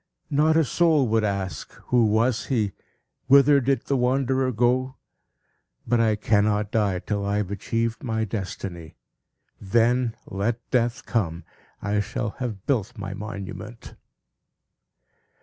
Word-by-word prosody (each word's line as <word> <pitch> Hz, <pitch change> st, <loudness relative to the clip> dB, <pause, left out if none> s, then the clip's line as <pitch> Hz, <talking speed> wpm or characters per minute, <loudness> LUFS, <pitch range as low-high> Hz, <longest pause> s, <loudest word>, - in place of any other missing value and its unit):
Not 155 Hz, +3 st, +3 dB
a 165 Hz, -, +5 dB
soul 155 Hz, -2 st, +3 dB
would 110 Hz, 0 st, +2 dB
ask, 95 Hz, -7 st, -3 dB, 0.2 s
'Who 120 Hz, -3 st, +4 dB
was 115 Hz, +1 st, +1 dB
he? 110 Hz, -7 st, 0 dB, 0.6 s
Whither 140 Hz, +1 st, +6 dB
did 135 Hz, +2 st, +1 dB
the 140 Hz, -, 0 dB
wanderer 130 Hz, +1 st, +1 dB
go?' 125 Hz, +3 st, +1 dB, 0.9 s
But, 120 Hz, -, +2 dB
I 110 Hz, -2 st, +3 dB
cannot 105 Hz, 0 st, +1 dB
die 105 Hz, -4 st, +1 dB
till 100 Hz, +2 st, -3 dB
I 100 Hz, +1 st, 0 dB
have 100 Hz, -2 st, -2 dB
achieved 115 Hz, +3 st, -2 dB
my 110 Hz, -3 st, -1 dB
destiny. 95 Hz, -5 st, -6 dB, 0.7 s
Then, 115 Hz, +3 st, +2 dB
let 115 Hz, +4 st, -3 dB
Death 120 Hz, 0 st, 0 dB
come! 85 Hz, -8 st, -1 dB, 0.4 s
I 105 Hz, 0 st, 0 dB
shall 105 Hz, +1 st, -2 dB
have 110 Hz, -6 st, -4 dB
built 125 Hz, -3 st, -1 dB
my 100 Hz, -1 st, -5 dB
monument!" 100 Hz, +2 st, -8 dB
115 Hz, 130 wpm, -24 LUFS, 100-125 Hz, 0.9 s, Whither